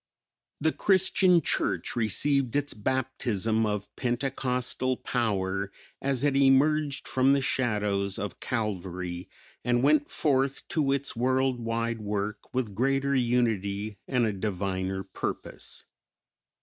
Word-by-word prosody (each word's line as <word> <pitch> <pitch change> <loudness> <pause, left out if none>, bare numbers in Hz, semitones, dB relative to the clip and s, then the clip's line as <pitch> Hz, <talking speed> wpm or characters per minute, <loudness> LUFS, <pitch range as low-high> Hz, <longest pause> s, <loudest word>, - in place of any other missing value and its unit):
The 160 +1 +2
Christian 185 -3 +4
Church - - 0
received 125 +4 +2
its 145 0 +1
baptism 115 -2 0
of 105 -1 -4
pentecostal 125 0 -1
power 100 -4 -1 0.3
as 135 -1 0
it 145 -2 +2
emerged 140 +2 +3
from 130 +1 +3
the 140 - +3
shadows 105 -7 0
of 100 -3 -5
Calvary, 90 -6 -3 0.3
and 120 0 +1
went 145 0 +3
forth 135 -2 0
to 145 -4 +1
its 140 -1 -1
world 130 +1 +1
wide 115 0 -2
work 105 0 -3
with 125 -5 -2
greater 135 +5 +1
unity 110 -5 0
and 125 -3 +2
a 110 - 0
diviner 95 -1 -2
purpose. - - -5
120 Hz, 115 wpm, -28 LUFS, 105-135 Hz, 0.3 s, Christian